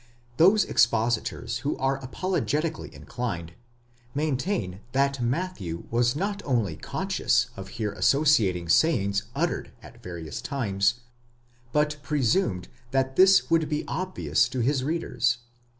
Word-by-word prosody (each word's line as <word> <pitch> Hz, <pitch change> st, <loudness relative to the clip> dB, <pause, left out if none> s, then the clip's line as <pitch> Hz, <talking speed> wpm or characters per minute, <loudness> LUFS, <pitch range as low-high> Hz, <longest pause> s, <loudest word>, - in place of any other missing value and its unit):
* 120 Hz, 0 st, -32 dB
Those 195 Hz, +3 st, +6 dB
expositors 115 Hz, 0 st, +1 dB
who -, -, -2 dB
are 135 Hz, +1 st, -1 dB
apologetically 160 Hz, +1 st, -2 dB
inclined, 90 Hz, -10 st, -5 dB, 0.6 s
maintain 140 Hz, -, -1 dB
that 140 Hz, 0 st, +1 dB
Matthew 120 Hz, -, -2 dB
was 120 Hz, +1 st, +2 dB
not 200 Hz, +5 st, -2 dB
only 115 Hz, -, 0 dB
conscious -, -, 0 dB
of 95 Hz, 0 st, -8 dB
here 110 Hz, -3 st, -1 dB
associating 105 Hz, -, +2 dB
sayings 100 Hz, -, +2 dB
uttered -, -, -1 dB
at -, -, -14 dB
various 85 Hz, -4 st, -6 dB
times, 115 Hz, -2 st, 0 dB, 0.7 s
but 150 Hz, +1 st, +1 dB
presumed 140 Hz, -, 0 dB, 0.2 s
that 135 Hz, +1 st, 0 dB
this 190 Hz, -2 st, +5 dB
would 165 Hz, -2 st, +3 dB
be 150 Hz, -1 st, -2 dB
obvious 185 Hz, -7 st, 0 dB
to 130 Hz, -1 st, -2 dB
his 130 Hz, +2 st, +1 dB
readers. 135 Hz, -6 st, 0 dB
130 Hz, 120 wpm, -26 LUFS, 105-155 Hz, 0.7 s, Those